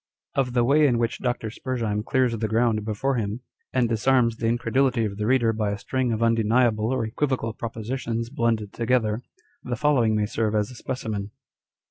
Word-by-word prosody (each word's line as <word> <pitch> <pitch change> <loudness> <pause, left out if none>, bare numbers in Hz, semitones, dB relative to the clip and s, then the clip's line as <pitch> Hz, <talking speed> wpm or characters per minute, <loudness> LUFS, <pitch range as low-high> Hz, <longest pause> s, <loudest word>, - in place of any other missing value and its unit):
Of 130 -3 0
the 120 -1 +3
way 145 +4 +5
in 120 -3 +2
which 115 +2 -1
Dr. 120 -3 -2
Spurzheim 115 -4 -2
clears 125 -1 +1
the 110 0 -1
ground 110 0 +2
Tjefore 120 +5 -1
him, 105 +3 -3 0.3
and 125 -2 +2
disarms 115 +1 +2
the 115 - -1
incredulity 120 +1 +1
of 100 -2 -4
the 105 0 -1
reader 120 -3 +3
by 105 -1 -1
a 100 - -2
string 130 +4 -1
of 115 0 0
undeniable 115 0 +2
or 130 -3 0
equivocal 115 -1 -1
propositions 115 +1 -4
blended 115 -6 0
together, 115 -2 +1 0.4
the 125 - -3
following 125 -7 +2
may 105 -1 +1
serve 110 0 -1
as 105 +2 0
a - - -11
specimen. 110 -5 -4
115 Hz, 180 wpm, -25 LUFS, 110-125 Hz, 0.4 s, way